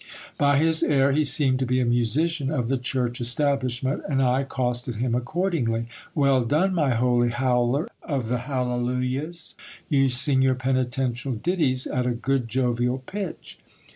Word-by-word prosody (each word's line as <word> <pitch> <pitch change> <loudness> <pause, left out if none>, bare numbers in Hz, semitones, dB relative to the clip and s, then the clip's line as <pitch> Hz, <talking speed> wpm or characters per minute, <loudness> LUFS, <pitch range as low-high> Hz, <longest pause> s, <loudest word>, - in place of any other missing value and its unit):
By 145 -1 +3
his 160 +2 +2
air, 140 -1 +3
he 150 +3 +2
seemed 135 -2 +3
to 130 - 0
be 130 +1 +1
a 125 - +1
musician 135 +6 +1
of 125 -6 -1
the 135 - +1
church 125 -1 -2
establishment, 130 +1 0
and 135 -2 +1
I 130 0 +2
accosted 125 -3 -2
him 120 +2 -1
accordingly. 125 -3 -1 0.3
Well 140 -3 +3
done, 160 +11 +1
my 145 -8 +1
holy 120 0 +2
howler 125 +3 +1
of 135 -7 -3
the 125 +1 -1
hallelujahs! 125 +4 -3 0.4
You 135 -2 +3
sing 130 +2 +1
your 130 -1 +3
penitential 130 0 -1
ditties 135 0 0
at 125 -1 -1
a 120 - 0
good 130 0 -1
jovial 125 +1 0
pitch. 195 - -7
130 Hz, 155 wpm, -24 LUFS, 125-140 Hz, 0.4 s, By